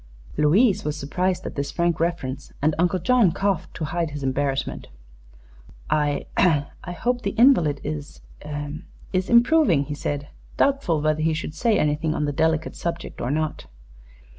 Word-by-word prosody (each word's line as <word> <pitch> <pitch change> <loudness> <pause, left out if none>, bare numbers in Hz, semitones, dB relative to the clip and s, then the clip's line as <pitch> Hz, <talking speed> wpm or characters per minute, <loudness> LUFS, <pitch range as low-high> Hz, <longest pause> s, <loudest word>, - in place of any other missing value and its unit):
Louise 190 +8 +3
was 150 0 -2
surprised 180 +6 -1
at - - -5
this 140 0 -3
frank 170 -2 0
reference, 165 -6 -2
and 155 +2 +2
Uncle 180 +2 +2
John 210 +1 +3
coughed 195 -1 -1
to 160 - -3
hide 170 +1 -2
his 145 -1 -6
embarrassment. 135 +1 -1 1.0
"I 145 -2 +1
I 160 0 +1
hope 245 +7 -1
the 200 -1 -3
invalid 175 - +5
is 150 -1 -5 0.9
is 185 0 0
improving," 235 - +5
he 145 - -5
said, 145 0 -4 0.3
doubtful 270 - +2
whether 155 0 +1
he 160 0 +1
should 155 -1 -4
say 225 +5 +2
anything 155 +1 0
on 150 - 0
the 145 - -1
delicate 160 +2 0
subject 170 0 -5
or - - -2
not. 155 +2 -2
160 Hz, 155 wpm, -24 LUFS, 145-185 Hz, 1.0 s, invalid